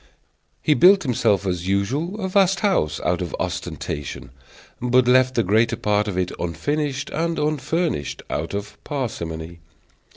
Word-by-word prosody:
He 155 - +4
built 190 +5 +6
himself, 105 - +1
as 90 -1 -2
usual, 135 - -1
a 190 - -2
vast 190 -1 +3
house, 80 - +1
out 90 +1 0
of 90 - -3
ostentation, 70 -2 -4 0.5
but 125 0 +3
left 130 0 +4
the 115 - +3
greater 110 +5 +2
part 105 -2 0
of 95 -3 -3
it 90 -1 0
unfinished 140 - -2
and 165 +1 -1
unfurnished, 150 - -1
out 80 +6 -3
of 100 0 -7
parsimony. 85 - -4
120 Hz, 140 wpm, -22 LUFS, 90-150 Hz, 0.5 s, built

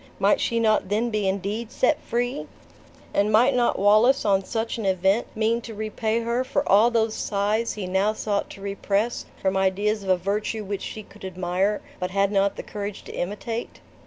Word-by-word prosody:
Might - - +3
she 230 -1 +1
not 215 -4 +2
then 225 +3 0
be 210 -2 0
indeed 200 +4 -2
set 285 +4 +2
free? 245 +4 -2 0.7
And 205 +1 +2
might 245 +6 +5
not 245 -1 +2
Wallace, 215 +7 +4
on 195 -2 +3
such 225 +3 -3
an 220 - -3
event, 190 +4 +2
mean 225 +2 +1
to 225 -2 -8
repay 220 +1 -1
her 235 +2 0
for 280 +2 -1
all 210 +4 +6
those 225 -2 +1
sighs 210 +3 0
he 205 -3 -5
now 190 +3 +1
sought 205 -2 -2
to 195 - -11
repress 200 +3 -1
from 190 0 0
ideas 200 +3 +1
of 195 - -6
a 185 - +4
virtue 210 +4 -2
which 200 -1 -4
she 215 - -6
could 200 0 -17
admire, 185 +2 -1 0.2
but 180 - -2
had 200 +1 +1
not 200 -1 +2
the - - -6
courage 205 -1 -6
to - - -9
imitate? 220 +5 -4
210 Hz, 190 wpm, -24 LUFS, 195-230 Hz, 0.7 s, all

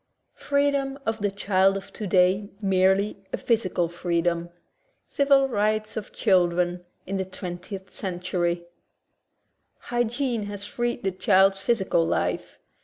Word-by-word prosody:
Freedom 280 -1 +1
of 225 0 -1
the 205 0 +1
Child 195 -1 +2
of 195 0 -10
Today 190 0 +2
Merely* 195 +1 +2
a - - -1
Physical 190 -7 +1
Freedom 170 0 -1 0.3
— - - -45
Civil 275 -1 +3
Rights 215 -2 0
of 215 -2 -5
Children 180 -3 +2 0.2
in 195 +1 -3
the 190 - -1
Twentieth 185 +1 -7
Century 175 -2 -2 1.1
Hygiene 240 -2 -1
has 205 -1 -5
freed 240 +3 -2
the 195 - +1
child's 195 +1 +3
physical 195 -5 +1
life. - - -1
195 Hz, 120 wpm, -25 LUFS, 180-220 Hz, 1.1 s, Civil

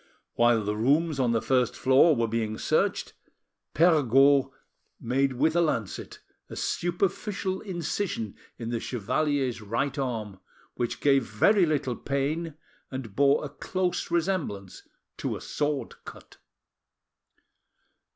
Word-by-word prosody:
While 120 -2 +3
the 105 +1 -2
rooms 145 +7 +1
on 125 -3 +2
the 115 -1 0
first 125 -2 +1
floor 135 +5 +5
were 115 -2 0
being 110 -1 -2
searched, - - 0 0.6
Perregaud 140 -4 +5 0.5
made 135 +3 0
with 155 +6 +1
a 170 - +4
lancet 115 - -2 0.3
a - - -8
superficial 190 +2 -2
incision 175 - -3 0.2
in 115 -1 -5
the 115 - -1
chevalier's 130 +2 -1
right 120 +7 -2
arm, 110 -7 -3 0.3
which 120 -1 -3
gave 135 -2 +4
very 180 - +4
little 140 -5 -1
pain, 145 +5 -2 0.3
and 125 -6 -7
bore 140 +2 +3
a - - -6
close 180 +4 -2
resemblance 165 - -2 0.4
to - - -3
a - - -6
sword 145 -1 -2
cut. - - -12
135 Hz, 120 wpm, -27 LUFS, 115-160 Hz, 0.6 s, floor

